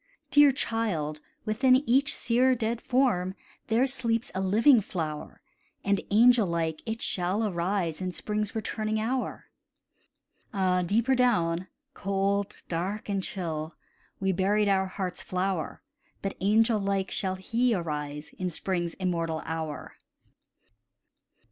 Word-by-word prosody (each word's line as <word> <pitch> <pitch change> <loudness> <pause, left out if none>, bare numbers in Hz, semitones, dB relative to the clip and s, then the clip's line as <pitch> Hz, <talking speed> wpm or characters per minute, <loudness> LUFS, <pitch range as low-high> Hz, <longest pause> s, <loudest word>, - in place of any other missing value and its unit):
"Dear 290 -1 +7
child, 200 - -2 0.3
within 255 +4 +4
each 270 +4 +3
sere 255 +2 +3
dead 230 0 -2
form 195 -8 +1 0.3
There 230 +3 +3
sleeps 235 -3 -1
a 190 - -2
living 220 +6 +5
flower, 160 -6 -5 0.4
And 200 -1 +2
angel 230 0 +6
like 165 -2 -1
it 225 +1 -3
shall 185 +4 0
arise 180 -3 -1
In 185 0 -2
spring's 210 +3 -3
returning 215 0 -2
hour." 250 +4 -3 1.0
Ah, 185 -2 +2
deeper 225 +9 +2
down 185 -9 +2 0.3
cold, 200 0 -1
dark, 190 +6 -3
and 200 -1 0
chill 160 -5 -4 0.4
We 195 0 +1
buried 200 +3 +2
our 190 -1 +2
heart's 185 -1 -4
flower, 185 -3 -2 0.4
But 195 - -2
angel 220 +3 +3
like 195 -1 -1
shall 190 -1 -1
he 230 +5 +1
arise 150 -3 -4
In 185 -1 -1
spring's 175 0 -2
immortal 165 -4 -2
hour. 160 -3 -5
195 Hz, 125 wpm, -28 LUFS, 175-225 Hz, 1.0 s, Dear